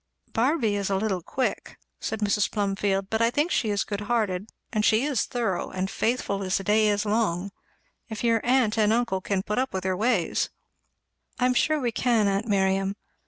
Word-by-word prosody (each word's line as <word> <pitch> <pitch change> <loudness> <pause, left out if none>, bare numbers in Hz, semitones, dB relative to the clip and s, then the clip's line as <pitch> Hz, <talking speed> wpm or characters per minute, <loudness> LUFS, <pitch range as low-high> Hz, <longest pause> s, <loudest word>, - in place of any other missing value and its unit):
"Barby 235 -3 +1
is 200 -1 -1
a 195 - +1
little 190 -2 -1
quick," 255 +9 -3 0.2
said 220 -1 -4
Mrs. 210 0 +2
Plumfield, 195 -1 -1
"but 220 0 +1
I 230 - +4
think 295 +8 0
she 220 - +1
is 205 -1 +1
good 205 -1 -4
hearted, 210 -3 -1 0.2
and 215 -1 +1
she 220 +3 +4
is 285 -6 0
thorough, 230 -8 -2
and 185 +1 -3
faithful 225 -4 -1
as 185 -1 0
the 195 - -5
day 215 +2 +3
is 205 0 +1
long. 200 -3 0 0.6
If 220 0 -5
your 230 -2 +3
aunt 240 -3 +2
and 210 0 +4
uncle 230 -5 +1
can 190 0 -1
put 210 +4 -1
up 260 -6 -2
with 190 - -2
her 185 0 0
ways." 215 -3 +1 0.9
"I 250 - +3
am 250 - +3
sure 305 +5 +2
we 245 -4 -1
can, 230 -3 +2
aunt 200 +3 0
Miriam. 195 -1 +1
210 Hz, 200 wpm, -26 LUFS, 195-235 Hz, 0.9 s, I